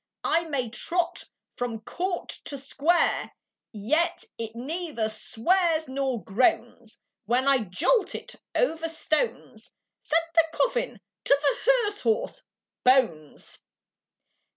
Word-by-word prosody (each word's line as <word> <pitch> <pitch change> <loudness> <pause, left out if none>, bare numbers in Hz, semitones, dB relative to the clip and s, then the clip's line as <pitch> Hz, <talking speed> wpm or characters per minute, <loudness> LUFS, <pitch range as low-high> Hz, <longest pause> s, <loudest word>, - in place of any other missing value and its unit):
I 335 +1 +2
may 275 -6 -1
trot 340 +9 -2 0.3
from 235 -3 -3
court 355 - -3 0.2
to 280 - -4
square, 285 +5 +1 0.4
Yet 320 - 0 0.2
it 225 0 -5
neither 290 -2 -3
swears 315 +9 +1
nor 260 -5 -2
groans, 235 +2 0 0.3
When 245 +5 +1
I 275 -1 +5
jolt 220 - +1
it - - -7 0.2
over 330 -9 +1
stones." 320 +7 -2 0.3
Said 330 +2 +1
the 330 -1 +5
coffin - - 0 0.2
to 280 - +5
the 290 - +2
hearse 420 -5 +1
horse, 460 +3 0 0.4
"Bones!" 230 - +1
285 Hz, 110 wpm, -26 LUFS, 240-345 Hz, 0.4 s, I